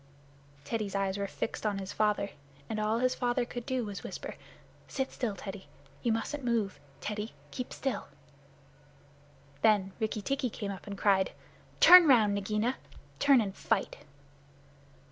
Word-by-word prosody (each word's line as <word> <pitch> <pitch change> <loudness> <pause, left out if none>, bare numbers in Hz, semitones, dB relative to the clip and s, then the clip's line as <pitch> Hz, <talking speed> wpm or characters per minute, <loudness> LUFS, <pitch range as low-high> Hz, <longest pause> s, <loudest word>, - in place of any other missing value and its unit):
Teddy's 205 +5 -3
eyes 195 -1 0
were 200 - -1
fixed 225 - -4
on 210 -2 0
his 190 -1 -5
father, 210 -2 +1 0.4
and 215 - -3
all 215 +1 +1
his 255 +1 +2
father 245 0 0
could 245 0 -7
do 260 -3 0
was 205 -1 -5
to - - -7
whisper, - - -6 0.5
"Sit 265 -1 -2
still, 225 -6 -2
Teddy. 195 -4 -8 0.3
You 235 - +1
mustn't 260 +6 -2
move. 230 -5 0 0.2
Teddy, 210 +1 -4 0.2
keep 250 - -5
still." 270 -2 -3 1.5
Then 205 -3 +4
Rikki 215 -2 -2
tikki 270 0 0
came 205 -2 -5
up 190 0 -9
and 200 -1 -5
cried, 195 -2 +3 0.5
"Turn 360 -2 +10
round, 220 -7 +5
Nagaina. 210 +5 0 0.4
Turn 280 -3 +6
and 200 -3 -3
fight!" 220 -4 -1
215 Hz, 150 wpm, -31 LUFS, 200-245 Hz, 1.5 s, Turn